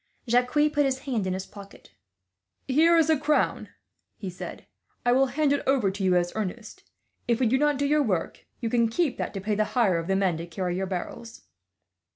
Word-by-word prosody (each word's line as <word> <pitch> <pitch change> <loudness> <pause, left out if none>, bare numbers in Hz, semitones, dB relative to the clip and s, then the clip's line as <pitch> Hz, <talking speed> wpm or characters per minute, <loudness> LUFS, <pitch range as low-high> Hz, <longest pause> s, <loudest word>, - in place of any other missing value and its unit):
Jacques 245 +2 +2
put 300 0 +2
his 270 -2 0
hand 245 -9 -2
in 185 - -1
his 190 +1 -4
pocket. 200 - -14 0.8
"Here 320 +5 +4
is 320 -2 +4
a 315 -3 +3
crown," 300 0 0 0.5
he 195 -4 -6
said. 180 - -8 0.4
"I 245 - +4
will 265 +2 +4
hand 285 +2 +1
it 285 - 0
over 255 -8 +2
to 195 +1 -5
you, 185 -1 +3
as 175 0 +1
earnest. 215 +1 -5 0.5
If 235 -2 +1
we 260 - +2
do 255 +4 +2
not 295 -1 +2
do 285 - 0
your 300 +1 +3
work, 190 - -2
you 230 - -1
can 235 -2 +2
keep 285 +2 -1
that - - -2
to - - -2
pay 210 +2 -1
the 215 +1 +2
hire 190 -8 +3
of 165 - -6
the 195 - +1
men 190 -4 +1
to 170 +1 -6
carry 175 +1 -3
your 190 +1 -2
barrels." 200 +5 -6
230 Hz, 215 wpm, -26 LUFS, 190-280 Hz, 0.8 s, Here